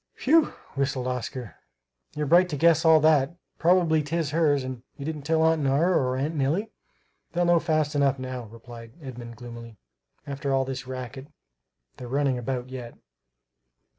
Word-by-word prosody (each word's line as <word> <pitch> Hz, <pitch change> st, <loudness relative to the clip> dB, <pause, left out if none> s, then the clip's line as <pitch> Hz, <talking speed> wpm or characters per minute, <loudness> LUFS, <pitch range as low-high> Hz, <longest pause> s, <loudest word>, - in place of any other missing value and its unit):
"Whew!" 320 Hz, +4 st, +5 dB, 0.3 s
whistled 135 Hz, -2 st, -1 dB
Oscar. 125 Hz, -2 st, -4 dB, 0.6 s
"You're 150 Hz, 0 st, -1 dB
bright 175 Hz, +5 st, +5 dB
to 150 Hz, -, -3 dB
guess 165 Hz, +1 st, +4 dB
all 160 Hz, -1 st, +7 dB
that; 155 Hz, 0 st, +3 dB, 0.2 s
probably 170 Hz, -2 st, +4 dB
'tis 155 Hz, 0 st, -2 dB
hers. 150 Hz, -4 st, +2 dB
And 130 Hz, -2 st, -6 dB, 0.2 s
you 140 Hz, -, -7 dB
didn't 155 Hz, -1 st, -4 dB
tell 160 Hz, +2 st, +1 dB
Aunt 160 Hz, -1 st, +3 dB
Nora 145 Hz, +7 st, +2 dB
or 130 Hz, -3 st, +1 dB
Aunt 145 Hz, +4 st, -1 dB
Nellie?" 160 Hz, +10 st, 0 dB, 0.6 s
"They'll 175 Hz, 0 st, +1 dB
know 175 Hz, 0 st, +4 dB
fast 155 Hz, -2 st, 0 dB
enough 140 Hz, -2 st, +2 dB
now," 130 Hz, -2 st, -5 dB
replied 115 Hz, +1 st, -12 dB
Edmund 120 Hz, -5 st, -9 dB
gloomily, 115 Hz, -1 st, -10 dB, 0.5 s
"after 140 Hz, 0 st, -3 dB
all 135 Hz, 0 st, +2 dB
this 130 Hz, 0 st, -5 dB
racket 130 Hz, +1 st, -7 dB, 0.7 s
they're 125 Hz, -, -8 dB
running 135 Hz, 0 st, 0 dB
about 125 Hz, 0 st, -4 dB
yet!" 125 Hz, -2 st, -8 dB
140 Hz, 160 wpm, -26 LUFS, 130-160 Hz, 0.7 s, all